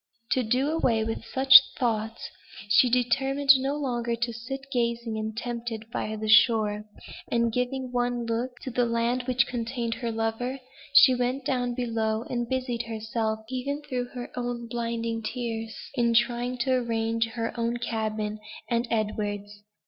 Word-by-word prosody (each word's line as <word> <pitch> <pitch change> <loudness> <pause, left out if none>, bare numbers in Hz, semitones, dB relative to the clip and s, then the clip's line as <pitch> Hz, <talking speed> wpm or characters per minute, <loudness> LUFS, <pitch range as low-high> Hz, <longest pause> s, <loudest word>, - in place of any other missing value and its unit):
To 260 - +3
do 255 +5 +1
away 235 -9 +2
with 225 0 -3
such 265 0 +8 0.2
thoughts, 225 -2 -2 0.4
she 245 +4 +6
determined 270 +3 +3
no 270 +2 -1
longer 240 -5 -1
to 235 0 -2
sit 270 +4 -6
gazing, 235 -2 -1
and 220 0 -4
tempted 235 -2 -5
by 215 - -2
the 215 0 -4
shore; 215 -1 +4 0.4
and, 235 -1 +1
giving 250 +1 -2
one 245 -1 -1
look 240 +2 -2
to 260 - -5
the 245 0 +1
land 235 +2 0
which 250 -1 +3
contained 235 -1 -3
her 235 0 -3
lover, 225 +4 -2 0.3
she 280 -2 +8
went 250 +2 -1
down 245 -2 0
below, 225 -2 -1
and 240 -1 -2
busied 255 -2 -1
herself, 220 0 -2
even 280 +3 -3
through 255 -4 -3
her 245 0 -8 0.4
blinding 230 -1 -2
tears, 225 -1 -4 0.2
in 235 -3 +1
trying 240 +1 +1
to 260 - +1
arrange 230 -2 0
her 230 -1 -3
own 235 0 -1
cabin, 215 -2 -3 0.3
and 235 0 0
Edward's. 205 -2 -2
235 Hz, 150 wpm, -27 LUFS, 225-250 Hz, 0.4 s, such